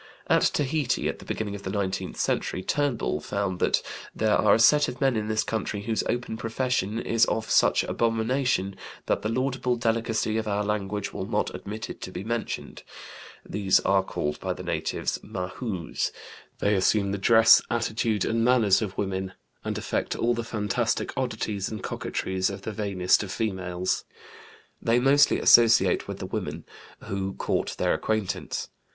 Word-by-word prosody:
At - - +3
Tahiti 145 -2 +1
at - - -3
the - - -12
beginning 105 -2 -3
of 100 - -6
the 95 - -5
nineteenth 95 -1 -2
century, 95 - -1
Turnbull 135 - 0
found 100 -1 -2
that - - +2 0.3
"there 110 -1 +2
are - - +5
a - - +1
set 145 +5 +6
of 125 - -6
men 135 -3 +2
in 105 -1 -1
this 110 0 +1
country 110 -2 -3
whose 110 +1 0
open 120 -2 -2
profession 115 -2 -1
is 115 -1 +2
of 110 0 -2
such - - +4
abomination 115 -3 0 0.3
that - - 0
the 110 - -2
laudable 130 +1 0
delicacy 115 -1 0
of 110 - -4
our 105 0 0
language 105 -1 -2
will 95 - -4
not 105 -1 -1
admit 110 +2 -6
it - - -9
to - - -5
be 90 +1 -6
mentioned. 115 +1 -4 0.7
These 100 -2 +2
are 95 0 +3
called 75 -5 -3
by - - -2
the - - -9
natives - - -2
Mahoos; 90 - -3 0.5
they 100 - +1
assume 100 +1 +2
the 100 - -2
dress, 115 +2 +7
attitude, 110 -3 0
and 115 0 +1
manners 115 -5 +4
of 105 -4 -4
women, 95 -1 -2 0.3
and - - -3
affect - - -2
all 120 +1 +1
the 120 0 -3
fantastic 110 +1 -1
oddities 110 -6 -2
and 110 -3 -6
coquetries 95 0 -2
of 100 0 -7
the 110 - -4
vainest 100 -4 +1
of 100 -3 -5
females. 95 -4 -2 0.8
They 115 +1 +2
mostly 140 +3 +4
associate 115 -1 +5
with - - -5
the - - -5
women, - - -4 0.4
who 95 -2 -3
court - - -1
their - - +2
acquaintance. 110 -3 -2
110 Hz, 170 wpm, -26 LUFS, 100-115 Hz, 0.8 s, dress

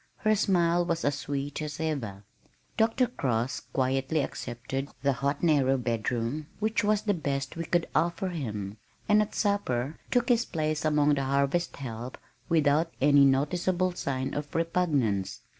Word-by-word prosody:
Her 215 -1 +2
smile 175 -4 +2
was 170 -1 -1
as 145 - +2
sweet 145 0 -4
as 150 -1 -5
ever. 125 -12 -3 0.5
Dr. 230 +3 +3
Cross 130 - -1
quietly 135 +3 +1
accepted 130 +1 -4
the 140 -1 +3
hot 140 +4 -2
narrow 140 -5 +3
bedroom 120 +4 -2
which 220 +1 0
was 210 0 +2
the 205 - +2
best 140 -5 -3
we 165 0 -4
could 175 +1 +1
offer 170 +4 +1
him, 105 - -4 0.3
and 210 0 +5
at 210 - -3
supper 155 - 0
took 245 +1 +1
his 235 -1 +4
place 155 -6 -2
among 150 -1 +3
the 140 -1 0
harvest 140 +5 +1
help 120 -2 -6 0.3
without 160 0 +3
any 140 0 +6
noticeable 175 +7 +1
sign 135 -6 -3
of 145 0 -5
repugnance. 140 - 0
145 Hz, 150 wpm, -28 LUFS, 135-175 Hz, 0.5 s, any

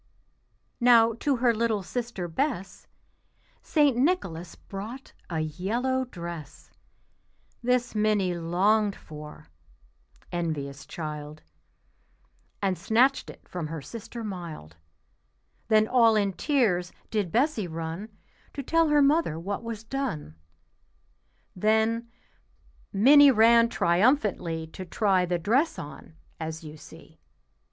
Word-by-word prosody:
Now 235 -2 +6
to 285 -2 +1
her 240 -1 +3
little 225 -3 0
sister 235 -4 -4
Bess 195 - -3 0.7
St. 290 -5 +2
Nicholas 240 - -1
brought 220 +7 -9 0.2
a 160 -3 -1
yellow 230 - -1
dress; 170 - -9 0.9
This 245 0 +1
Minnie 210 -4 +1
longed 195 +5 +1
for 150 - -11 0.8
(envious 145 -5 -4
child), 150 -1 -7 1.2
And 190 -2 0
snatched 255 +5 +2
it - - -13
from 175 -4 -5
her 160 +1 -5
sister 230 - -8
mild. 170 - -7 0.9
Then 215 0 +4
all 230 -3 +5
in 200 -2 +1
tears 190 - +1 0.2
did 205 -6 -1
Bessie 240 - +1
run 165 +5 -5 0.5
To 280 - -4
tell 330 +4 +2
her 295 -1 +5
mother 285 - +2
what 195 +4 -4
was 230 -2 -6
done. 225 - -4 1.2
Then 220 +4 +1 0.8
Minnie 280 +8 +7
ran 230 -1 +5
triumphantly 180 - +1
To 160 +4 -9
try 185 0 +1
the 175 0 0
dress 245 - +1
on, 150 +2 -10 0.2
as 160 0 -5
you 155 -1 -9
see. 155 - -15
210 Hz, 110 wpm, -27 LUFS, 170-240 Hz, 1.2 s, Minnie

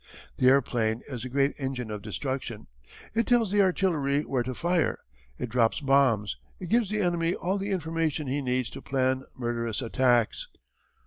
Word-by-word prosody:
"The 130 - +3
airplane 120 -4 +2
is 125 -3 -5
a - - -5
great 140 +2 +2
engine 130 -4 -3
of 105 -1 -5
destruction. 115 +2 -4 0.5
It 230 +1 +1
tells 235 -5 +3
the 205 0 +4
artillery 160 -7 +1
where 130 -4 -1
to 125 +1 -4
fire, 175 +3 +1 0.4
it 125 - -3
drops 115 +2 +2
bombs, 135 -8 +2 0.2
it 180 - -6
gives 230 -2 +3
the 210 0 0
enemy 175 -2 +1
all 190 +3 -1
the 200 +1 -3
information 165 -4 -1
he 140 +2 -1
needs 125 -2 -1
to - - -8
plan 130 0 0
murderous 115 -2 -2
attacks. 120 -1 +1
135 Hz, 170 wpm, -27 LUFS, 120-170 Hz, 0.5 s, the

